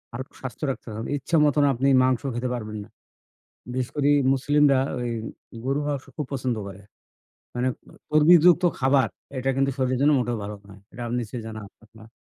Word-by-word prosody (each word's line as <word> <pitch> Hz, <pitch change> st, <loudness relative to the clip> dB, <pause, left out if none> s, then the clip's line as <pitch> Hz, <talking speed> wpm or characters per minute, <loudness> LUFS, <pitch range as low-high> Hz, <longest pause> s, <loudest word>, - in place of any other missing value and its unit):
আর 130 Hz, -, -4 dB, 0.2 s
স্বাস্থ্য 130 Hz, +3 st, -8 dB
রাখতে 130 Hz, -, -9 dB
হয়। 110 Hz, -, -5 dB, 0.2 s
ইচ্ছে 150 Hz, +5 st, -2 dB
মতন 145 Hz, 0 st, +3 dB
আপনি 130 Hz, +3 st, 0 dB, 0.2 s
মাংস 130 Hz, -2 st, +2 dB
খেতে 125 Hz, +1 st, -2 dB
পারবেন 110 Hz, -3 st, -5 dB
না। 110 Hz, -, -17 dB, 0.8 s
বিশেষ 130 Hz, -1 st, -2 dB
করি 145 Hz, 0 st, +2 dB, 0.2 s
মুসলিমরা 145 Hz, +1 st, +3 dB, 0.2 s
ওই 120 Hz, -1 st, -2 dB, 0.5 s
গরুর 140 Hz, +3 st, 0 dB
মাংস 140 Hz, -2 st, -3 dB
খুব 150 Hz, -, -3 dB
পছন্দ 125 Hz, -3 st, -1 dB
করে। 100 Hz, +1 st, -10 dB, 0.7 s
মানে 125 Hz, +1 st, 0 dB, 0.2 s
এ -, -, -16 dB, 0.2 s
চর্বিযুক্ত 170 Hz, +3 st, +6 dB, 0.2 s
খাবার 135 Hz, -2 st, +3 dB
আ -, -, -24 dB
এটা 130 Hz, +1 st, -1 dB
কিন্তু 135 Hz, 0 st, +2 dB
শরীরের 130 Hz, -1 st, 0 dB
জন্য 150 Hz, +2 st, +5 dB
মোটেও 120 Hz, -1 st, -1 dB
ভালো 105 Hz, +1 st, -5 dB
নয়। 100 Hz, 0 st, -13 dB
এটা 120 Hz, -, -9 dB
আপ 115 Hz, -, -5 dB
নিশ্চয়ই 115 Hz, 0 st, -6 dB
জানা 110 Hz, -1 st, -7 dB, 0.3 s
আপনার? 110 Hz, 0 st, -16 dB
130 Hz, 180 wpm, -24 LUFS, 120-140 Hz, 0.8 s, চর্বিযুক্ত